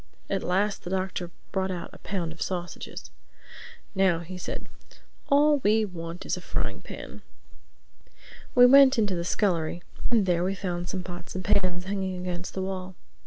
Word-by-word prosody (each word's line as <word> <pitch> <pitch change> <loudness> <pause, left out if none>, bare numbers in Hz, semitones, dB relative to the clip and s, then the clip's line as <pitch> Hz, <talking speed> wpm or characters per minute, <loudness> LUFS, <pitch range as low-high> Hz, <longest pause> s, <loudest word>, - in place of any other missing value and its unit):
At 195 -1 +1
last 195 +3 +1
the - - -5
Doctor 185 -2 -2 0.2
brought 190 -1 0
out 180 -2 -4
a - - -12
pound 180 -5 -3
of 160 - -11
sausages. 175 -2 -4 0.8
"Now," 190 -4 +3
he 180 +2 -7
said, 180 - -5 0.6
"all 290 +1 +5
we 215 -1 +3
want 170 -2 -7
is - - 0
a 180 - -7
frying - - -3
pan." - - -9 1.3
We 245 0 +9
went 270 +1 +8
into 210 -4 +2
the 170 -1 -1
scullery 175 -3 0 0.3
and 225 -5 +4
there 175 -2 +2
we 190 +2 0
found 175 -2 -3
some 185 -2 -3
pots 175 -1 -8
and 185 -1 -4
pans 180 -2 +2
hanging 190 -1 -2
against 180 0 -4
the 190 - -1
wall. 185 -1 -4
185 Hz, 165 wpm, -27 LUFS, 175-200 Hz, 1.3 s, We